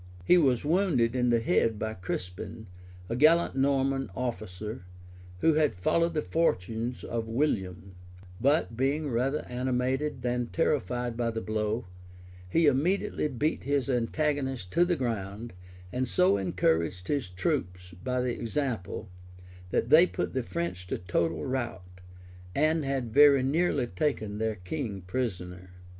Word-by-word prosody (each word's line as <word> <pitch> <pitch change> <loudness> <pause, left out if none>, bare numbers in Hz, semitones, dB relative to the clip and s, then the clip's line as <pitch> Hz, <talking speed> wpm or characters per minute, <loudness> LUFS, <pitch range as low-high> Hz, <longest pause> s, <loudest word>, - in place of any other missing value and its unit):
He 180 - +6
was 135 -5 +2
wounded 150 -9 +2
in 125 -1 +2
the 120 -1 +4
head 115 -1 +2
by 110 +1 -3
Crispin, 90 +3 -5 0.4
a 115 - -2
gallant 155 +5 +4
Norman 135 0 +1
officer, 110 -4 -4 0.6
who 165 - +5
had 150 - +2
followed 165 - +1
the 150 - 0
fortunes 115 - -1
of 115 -1 -3
William;[*] 95 - -1 0.5
but 140 -3 +2
being 140 +5 0
rather 130 +5 0
animated 130 +2 -1
than 125 -1 0
terrified 125 -5 0
by 120 0 0
the 115 0 -3
blow, 110 +2 -2 0.6
he 165 - +3
immediately 150 +4 +1
beat 150 +3 -1
his 140 -1 0
antagonist 130 -3 -1
to 175 - +4
the 175 0 +1
ground, 115 - -4 0.4
and 130 +1 0
so 180 - +3
encouraged 90 -2 0
his 140 -9 -1
troops 90 0 -2
by 125 0 0
the 125 -1 0
example, 115 - -3 0.6
that 115 - 0
they 160 +5 +8
put - - -3
the 130 - 0
French 90 -2 -4
to - - -2
total 85 -3 -1
rout, 95 -8 -4 0.5
and 155 +2 +2
had 135 -5 -2
very 140 -2 +7
nearly 145 -1 +1
taken 110 -2 -2
their 110 -1 0
king 100 - -5
prisoner. 90 -4 -4
125 Hz, 140 wpm, -29 LUFS, 105-140 Hz, 0.6 s, they